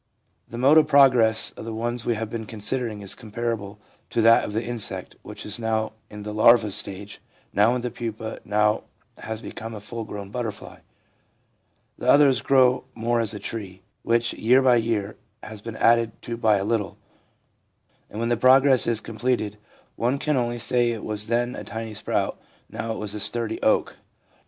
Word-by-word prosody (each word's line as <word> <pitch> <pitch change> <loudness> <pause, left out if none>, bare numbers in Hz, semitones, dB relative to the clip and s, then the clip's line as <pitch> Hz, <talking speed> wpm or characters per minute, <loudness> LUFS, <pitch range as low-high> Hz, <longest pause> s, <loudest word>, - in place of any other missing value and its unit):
The 115 - -8
mode 140 +6 +6
of 155 - +2
progress 125 -6 +5
of - - -10
the 115 0 -5
ones 120 +1 -2
we 120 - +2
have 110 +1 -3
been 110 -2 -5
considering 110 0 -2
is 100 - -4
com 110 - -12
parable 110 -3 -3 0.3
to 120 - -2
that 115 +1 +6
of 105 - -5
the 110 +2 -1
insect, 120 -3 -4
which - - -9
is 105 +2 -5
now 110 -1 -1 0.2
in 105 -1 -9
the 105 0 -5
larva 110 0 +5
stage, 100 +1 -4 0.3
now 110 +5 +4
in 125 - -2
the 125 0 -3
pupa, 110 -1 -5
and - - -18
now 105 +1 +1 0.3
has 110 +1 -6
become 110 0 -7
a - - -6
full 115 +3 -6
grown 100 -2 -8
butterfly. 115 -4 -6 1.2
The - - -1
others 140 -5 +5
grow 130 -1 +3
more 115 +1 0
as 110 -2 -1
a - - -6
tree, 95 -5 -6 0.2
which 120 0 +1
year 125 +4 +3
by 125 -2 +5
year 110 -3 -1 0.3
has 105 -1 -8
been 115 0 -7
added 115 -1 +3
to 120 - -4
by 110 -3 +3
a 100 - -2
little; 105 -3 -1 1.1
and 105 - -7
when 115 +1 -1
the 120 - +1
process 130 0 +5
is 115 -2 0
completed, 110 -2 -2 0.4
one 125 +4 +1
can 150 +1 0
only 120 -2 -1
say 120 0 +1
it 115 -2 -4
was 105 0 -4
then 120 +2 0
a - - -7
tiny 110 +2 -6
sprout, 105 - -2 0.3
now 115 0 -4
it - - -5
is 105 -1 -5
a 105 - -5
sturdy 115 +1 -1
oak. - - +1
115 Hz, 190 wpm, -24 LUFS, 105-120 Hz, 1.2 s, mode